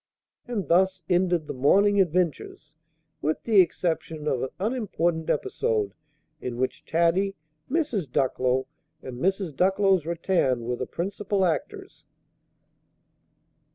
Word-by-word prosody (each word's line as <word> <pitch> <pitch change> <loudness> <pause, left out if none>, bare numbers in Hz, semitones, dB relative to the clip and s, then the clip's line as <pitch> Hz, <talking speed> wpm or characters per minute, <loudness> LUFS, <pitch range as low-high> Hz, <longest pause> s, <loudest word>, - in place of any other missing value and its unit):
And 215 -9 -3
thus 190 +3 +2
ended 180 -3 +2
the - - -5
morning 200 +10 +4
adventures, 170 -3 -2 0.5
with 155 +2 -1
the 215 -4 +6
exception 160 -3 -2
of 130 - 0
an 130 - -2
unimportant 180 -7 -1
episode, 105 -8 0 0.5
in 120 -1 -4
which 130 +1 -2
Taddy, 170 +4 +1 0.3
Mrs. 250 - -1
Ducklow, 130 0 +1 0.4
and 125 -1 -7
Mrs. 190 -2 -1
Ducklow's 190 -1 +2
rattan 170 -8 +1
were 125 +1 -2
the 130 - -4
principal 195 +2 -1
actors. 160 -6 -3
170 Hz, 115 wpm, -26 LUFS, 140-195 Hz, 0.5 s, the